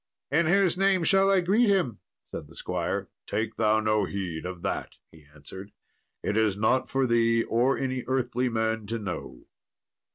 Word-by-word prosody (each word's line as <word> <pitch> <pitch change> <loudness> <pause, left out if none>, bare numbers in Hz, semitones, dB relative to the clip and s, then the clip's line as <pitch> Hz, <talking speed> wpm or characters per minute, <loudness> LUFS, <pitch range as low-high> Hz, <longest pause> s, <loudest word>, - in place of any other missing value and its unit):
"In 160 +3 +3
whose 180 0 +3
name 195 -2 +3
shall 195 +3 +4
I 195 -2 +4
greet 210 +6 +3
him?" 180 - +1 0.3
said - - -6
the - - -17
squire. - - -3 0.2
"Take 110 +3 -2
thou 110 -1 +3
no 110 -1 +1
heed 90 -4 -4
of 90 -1 -8
that," - - -3 0.2
he 80 -3 -18
answered; 95 +7 -11 0.5
"it 105 - -1
is 110 -3 +2
not 110 +5 +1
for 135 0 +1
thee 115 -1 +3
or 125 +4 +1
any 130 -2 -2
earthly 125 -1 0
man 110 -2 -1
to 115 +2 -2
know." 90 - -6
115 Hz, 170 wpm, -27 LUFS, 105-145 Hz, 0.5 s, shall